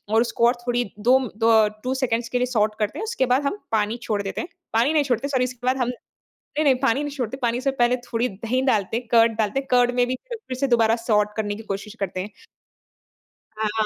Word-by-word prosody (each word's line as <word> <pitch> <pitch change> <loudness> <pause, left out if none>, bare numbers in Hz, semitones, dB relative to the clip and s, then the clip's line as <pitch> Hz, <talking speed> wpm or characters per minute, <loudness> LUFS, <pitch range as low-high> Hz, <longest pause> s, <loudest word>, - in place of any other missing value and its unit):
और 225 - +5
उसको 235 0 +2
और 240 - +2
थोड़ी 245 0 +1 0.2
दो 250 +5 +5 0.2
द 220 -2 +5
2 255 +1 -1
सेकंड़्स 230 -1 0
के 250 - 0
लिए 250 - +2
सॉट 215 -4 +1
करते 210 -1 -1
हैं, - - -3
उसके 445 - 0
बाद 255 +3 +2
हम 405 +9 -1
पानी 220 +1 +1
छोड़ 205 -2 -1
देते 195 - -3
हैं। 340 - -6 0.3
पानी 240 +7 +3
नहीं 300 -2 +3
छोड़ते 255 0 -1
सॉरी 260 -3 +1
उसके 250 0 -6
बाद 260 +1 +2
हम 245 -1 0 0.7
नहीं 310 - +3
नहीं, 270 - +5
पानी 270 +2 +2
नहीं 290 - -4
छोड़ते 255 -1 -3
पानी 240 -1 0
से 275 +1 +1
पहले 240 +1 +4
थोड़ी 245 0 -2
दही 230 +6 -2
डालते 220 -4 +1
हैं, 240 -1 -6
कर्ड 230 -1 +6
डालते 220 +5 0
हैं, 270 - -8
कर्ड 245 -1 +4
में 245 - +3
भी 255 - -1 0.2
फिर 435 - -6
से 275 +1 0
दोबारा 230 -2 +3
सॉट 210 -3 +1
करने 205 -1 -1
की 220 - -9
कोशिश 205 +2 -5
करते 185 -1 -2
हैं। 205 - -6 1.3
हाँ, 215 -1 0
हाँ, 215 - +2
240 Hz, 245 wpm, -23 LUFS, 220-255 Hz, 1.3 s, कर्ड